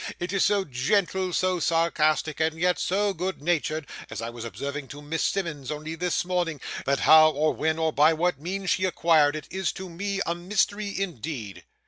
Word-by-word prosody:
It 175 +3 -3
is 195 - +2
so 200 -2 +2
gentle, 185 +7 0
so 185 0 +1
sarcastic, 155 -2 +1
and 160 0 0
yet 180 +1 +2
so 200 +2 +1
good 185 +2 -3
natured 155 -1 -1 0.2
(as - - -6
I 115 +1 -4
was 120 -1 -8
observing 135 +6 -5
to 145 +2 -10
Miss 160 +2 -2
Simmonds 165 -9 -2
only 155 +1 -4
this 175 +1 -1
morning), 175 -4 -1 0.3
that 140 0 +1
how, 155 0 +8
or 155 +1 +1
when, 160 0 0
or 160 -1 0
by 150 +2 +5
what 165 -1 0
means 190 +3 -2
she 185 - +1
acquired 160 -5 +3
it, 155 - -6
is 190 0 -1
to 190 -1 -7
me 200 +3 -3
a 170 - 0
mystery 200 +3 -1
indeed." 145 - -5
165 Hz, 190 wpm, -26 LUFS, 150-185 Hz, 0.3 s, how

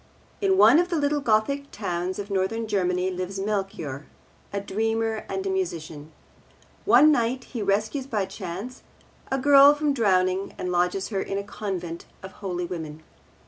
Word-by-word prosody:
In 385 -1 +3
one 330 - +7
of 350 +1 +1
the 345 - -1
little 295 -1 +1
Gothic 275 +4 +1
towns 180 -2 -3
of 205 0 -6
Northern 195 +4 -1
Germany 185 -2 0
lives 185 +2 -4
Melchior, 195 -9 -3 0.4
a 200 - -2
dreamer 225 +2 -1
and 385 - -3
a - - -1
musician. 160 - -4 0.7
One 305 +1 +7
night 255 -1 0
he 235 - -6
rescues 215 +7 0
by 210 -7 -1
chance 195 +7 -7 0.5
a 270 - +1
girl 280 +1 +7
from 295 -1 0
drowning 190 -5 +1
and 180 - -3
lodges 180 +2 0
her 195 -3 -1
in 195 - -3
a 200 - -2
convent 185 -5 -5 0.2
of 190 - -8
holy 180 -3 -4
women. 160 -3 -7
200 Hz, 160 wpm, -25 LUFS, 185-255 Hz, 0.7 s, one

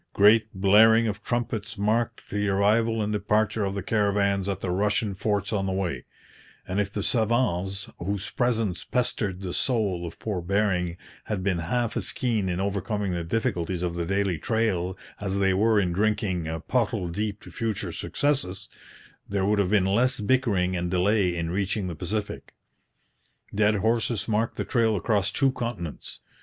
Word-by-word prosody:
Great 110 +2 +5
blaring 110 +4 +5
of 105 -1 -3
trumpets 120 -3 -3
marked 115 +3 -1
the 105 0 0
arrival 110 +3 +2
and 105 +1 -2
departure 105 +1 +1
of 100 0 -2
the 100 - -3
caravans 100 -2 +1
at 95 -2 -2
the 90 - -2
Russian 105 +2 +1
forts 100 +1 -1
on 95 -2 0
the - - -1
way; 90 -10 -2 0.6
and 95 +2 -1
if 100 -1 -3
the 105 -1 -3
savants, 105 -5 0
whose 100 +2 -3
presence 110 -8 0
pestered 115 -6 -1
the 90 -2 -4
soul 100 -9 0
of 85 - -9
poor 100 -5 -3
Bering, 90 -2 0 0.3
had 100 -4 -3
been 95 -3 +1
half 115 +6 -1
as - - -1
keen 110 -6 0
in 90 0 -2
overcoming 100 0 -1
the 85 -1 -2
difficulties 90 -3 -1
of 85 -1 -1
the 85 -1 -3
daily 100 -3 0
trail 100 -6 0 0.2
as 100 -1 -2
they 95 -1 +3
were 110 +2 +3
in 90 -3 0
drinking 100 -4 0 0.2
pottle 110 -6 0
deep 105 +4 -3
to - - -11
future 110 -4 -2
successes, 135 -11 -1 0.6
there 100 -1 0
would 105 +1 +2
have 95 -3 +2
been 100 -2 +3
less 120 +6 +2
bickering 105 -6 +1
and 90 0 -2
delay 95 0 +2
in 85 0 -2
reaching 100 +2 -1
the 90 - -3
Pacific. 100 +6 -4 1.0
Dead 105 +1 +3
horses 115 +2 0
marked 110 +1 0
the - - -2
trail 115 -3 +2
across 100 0 +1
two 135 -2 +2
continents. 115 - -5
100 Hz, 170 wpm, -26 LUFS, 95-110 Hz, 1.0 s, Great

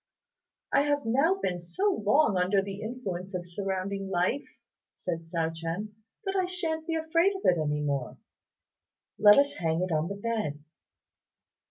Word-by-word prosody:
"I - - +6
have 290 -2 0
now 275 +11 +3
been 180 - -2
so 375 - 0
long 215 +1 +4
under 185 +2 +3
the 195 +1 -4
influence 195 -6 -5
of 175 -1 -3
surrounding 195 +1 -3
life," 185 +9 +1 0.5
said 165 -2 -4
Hsiao 165 -1 -1
ch'ien, 165 +6 -4 0.3
"that 385 0 -1
I 375 -2 +2
shan't 325 -3 -2
be 330 - 0
afraid 330 +5 +2
of 385 - -7
it 175 -2 +4
any 150 -1 0
more. 140 -3 -2 1.0
Let 205 0 +8
us 280 0 +4
hang 165 0 +1
it 185 - -2
on 155 +1 +1
the 200 - -4
bed." 200 -9 -3
200 Hz, 160 wpm, -29 LUFS, 175-285 Hz, 1.0 s, Let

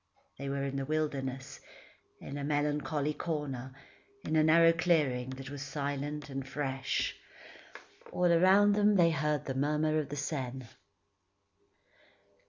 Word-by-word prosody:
They 140 0 -4
were 140 0 -2
in 140 0 -3
the 135 - -2
wilderness, 135 -3 -3 0.6
in 140 - -8
a 145 - -4
melancholy 145 0 0
corner, 145 -5 -4 0.5
in - - -2
a 155 - +5
narrow 165 +1 +6
clearing 150 -7 +1
that 135 0 -8
was 145 -1 -6
silent 145 +1 -4
and 135 -1 -4
fresh. 135 -1 -2 1.0
All 180 - 0
around 190 +4 +5
them 210 0 +4
they 170 -3 +5
heard 150 -2 -1
the 135 - -3
murmur 150 +3 +1
of 145 -2 -4
the 145 - -4
Seine. 135 -3 -4
145 Hz, 135 wpm, -31 LUFS, 135-155 Hz, 1.0 s, narrow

